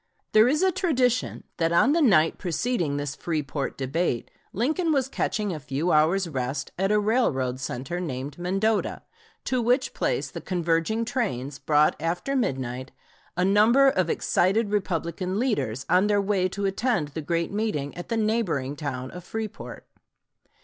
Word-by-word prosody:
There 215 +2 +6
is 300 +7 +2
a 380 - +4
tradition 255 -9 0
that 165 0 +1
on 170 +11 +4
the 330 +2 +3
night 195 - +4
preceding 175 - -1
this 145 -1 -3
Freeport 150 -4 -3
debate 135 -1 -1 0.2
Lincoln 315 - 0
was 270 -4 +2
catching 210 -6 -2
a 155 - -5
few 145 +5 -2
hours' 170 +5 +3
rest, 130 -2 -3
at 195 +1 +1
a 210 - +4
railroad 145 - +1
center 130 +6 -4
named 140 -3 -5
Mendota, 195 +5 0 0.4
to 255 -1 0
which 250 +3 +1
place - - -1
the - - -7
converging 175 +5 0
trains 145 - -2
brought 150 0 +3
after 175 - -2
midnight 130 - -2 0.5
a 180 - +2
number 225 +8 +5
of 185 -9 0
excited 200 +7 +1
Republican 185 -1 -1
leaders, 205 - -1
on 185 +3 +4
their 205 -1 +3
way 195 -2 +1
to 200 +2 -3
attend 195 - 0
the 160 +2 -5
great 170 +2 -1
meeting 200 -10 -2
at 175 - -8
the 230 - 0
neighboring 210 - 0
town 130 -4 -5
of 180 0 -9
Freeport. 220 +2 -6
180 Hz, 155 wpm, -25 LUFS, 150-225 Hz, 0.5 s, There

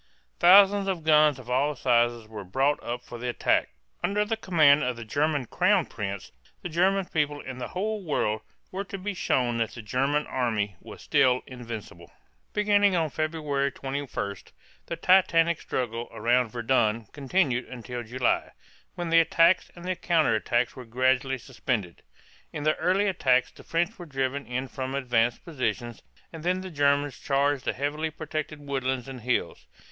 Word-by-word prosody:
Thousands 195 +2 +7
of 185 -4 -2
guns 150 -2 +5
of 130 -2 -12
all 140 +4 +1
sizes 120 -3 +1
were 110 -2 -8
brought 135 +10 0
up 120 +1 -4
for 120 -1 -9
the 125 +1 -3
attack. 120 - +1 0.3
Under 210 +1 +1
the 225 +2 -1
command 155 -9 +4
of 125 0 -1
the 115 -1 -8
German 145 +3 0
crown - - +2
prince, 100 -2 -6 0.3
the 180 - -4
German 185 +4 +2
people 150 -3 -1
and 130 -1 -7
the - - -3
whole 210 +2 -3
world 110 -9 -1 0.3
were 195 +2 -3
to 200 0 -7
be 200 +2 -4
shown 125 -9 0
that 115 - -2
the 120 - -7
German 135 +7 0
army 110 -6 -1
was - - -11
still 125 -1 +3
invincible. 115 - -9 0.4
Beginning 205 -2 +3
on 160 -3 0
February 150 -3 -1
21, 135 -7 -4 0.5
the 170 - -3
titanic 170 -2 +3
struggle 120 -1 -3
around 115 +2 +1
Verdun 115 -1 +1
continued 135 -3 0
until 125 -1 -7
July, 120 +2 -1 0.4
when 175 -2 -4
the 165 - +7
attacks 165 +2 +4
and 180 +1 -5
counter 160 -8 +3
attacks 120 +2 0
were 130 - -8
gradually 130 +3 +1
suspended. 120 -7 -4 0.5
In 150 - -5
the 155 +1 +2
early 190 +3 +2
attacks 130 -10 +2
the - - -15
French 175 +6 -1
were 175 - -8
driven 135 0 -2
in 130 +2 -3
from 130 0 -5
advanced 120 -3 0
positions, 120 - -3 0.3
and 165 - -8
then 180 +3 0
the 185 -1 -7
Germans 145 -2 +1
charged 140 -1 0
the - - 0
heavily 145 +4 -2
protected 155 -1 -5
woodlands 130 -3 -2
and 130 -2 -8
hills. 125 +2 -2
140 Hz, 165 wpm, -27 LUFS, 120-165 Hz, 0.5 s, Thousands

